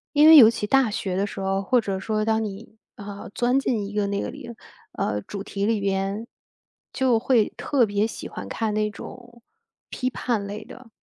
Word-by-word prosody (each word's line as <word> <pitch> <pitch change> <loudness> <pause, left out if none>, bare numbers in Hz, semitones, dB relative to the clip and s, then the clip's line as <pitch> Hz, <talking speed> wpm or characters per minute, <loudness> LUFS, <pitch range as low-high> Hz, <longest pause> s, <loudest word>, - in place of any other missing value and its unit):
因 295 +1 +7
为 320 0 +10
尤 230 -6 +10
其 225 -2 -3
大 265 +2 +3
学 195 -3 -3
的 195 +2 0
时 200 - -8
候， 195 0 -1
或 245 +6 +2
者 195 -3 -3
说 215 +2 -1
当 220 0 +1
你， 215 +2 -8 0.2
啊， 200 -1 -9
钻 245 +2 +2
进 235 -6 -1
一 200 - -8
个 205 -1 0
那 200 0 -2
个 - - -4
里 235 - -10 0.4
呃， 105 -1 -2
主 200 - -7
题 200 0 -3
里 220 0 +1
面， 195 +2 -2 0.6
就 255 -4 +2
会 235 -2 +2
特 270 -5 +2
别 205 +1 0
喜 - - -7
欢 - - -8
看 220 -2 -2
那 215 0 0
种 235 +3 -12 0.5
批 255 - -2
判 240 -4 -2
类 205 +2 -6
的 255 -1 -13
215 Hz, 220 characters per minute, -24 LUFS, 200-240 Hz, 0.6 s, 为